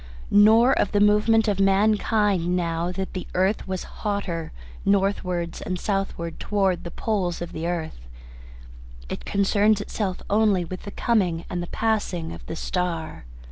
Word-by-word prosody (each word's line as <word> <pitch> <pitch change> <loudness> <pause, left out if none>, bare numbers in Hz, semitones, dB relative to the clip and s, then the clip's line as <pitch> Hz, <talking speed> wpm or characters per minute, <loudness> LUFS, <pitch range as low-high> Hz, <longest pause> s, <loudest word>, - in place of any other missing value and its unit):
Nor 220 +5 +6
of 205 - 0
the 205 - +3
movement 210 +2 +4
of 200 -2 0
mankind, 200 -2 +2
now 170 0 -1
that 190 +1 -4
the 185 - -5
earth 190 +3 +1
was 185 -1 -3 0.2
hotter, 200 -6 -2 0.3
northward 190 -3 0
and 185 -1 -3
southward 195 -5 -3
towards 195 -3 0
the 170 - -6
poles 185 -2 -2
of 175 0 -6
the 160 +1 -4
earth. 160 - -4 1.0
It - - -6
concerns 205 +1 +2
itself 200 -2 -3
only 205 -4 +2
with 185 +4 -8
the - - -5
coming 185 -9 0
and 175 - -2
the 175 - -5
passing 195 -7 -1
of - - -10
the - - -5
star. 165 - -3
190 Hz, 150 wpm, -24 LUFS, 175-210 Hz, 1.0 s, Nor